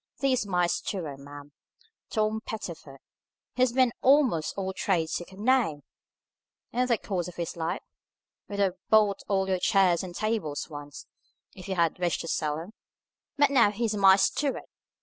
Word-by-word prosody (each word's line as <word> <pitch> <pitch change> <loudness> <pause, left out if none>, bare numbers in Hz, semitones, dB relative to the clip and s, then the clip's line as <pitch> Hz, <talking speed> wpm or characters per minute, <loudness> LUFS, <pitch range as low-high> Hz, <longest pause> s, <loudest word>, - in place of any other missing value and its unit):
This 265 -2 +2
is 205 - -3
my 180 -2 +2
steward, 170 -5 -3
ma'am, 145 +1 -11 0.6
Tom 215 0 0
Pettifer; 170 -10 -7 0.6
he's 255 -1 +2
been 255 -1 +3
a'most 260 - +3
all 190 -1 -2
trades 175 -4 0
you 175 - -9
could 190 - -15
name, 215 - +1 0.9
in 250 +1 +1
the 235 -2 +2
course 185 -5 -3
of 180 - -9
his 170 -2 -4
life, 165 -1 -3 0.6
would 200 - -6
have 190 -2 0
bought 210 -3 +4
all 190 -1 +1
your 185 -1 0
chairs 185 -3 +3
and 180 -2 -8
tables 215 -10 -2
once, 145 -1 -9 0.5
if 190 +1 -11
you 190 - -1
had 170 -1 +1
wished 175 -2 0
to - - -7
sell 150 -2 -1
'em, 170 +6 -9 0.7
but 290 -1 +4
now 245 -6 +5
he's 220 +1 -1
my 195 -2 +7
steward. 270 +8 0
190 Hz, 170 wpm, -27 LUFS, 170-220 Hz, 0.9 s, my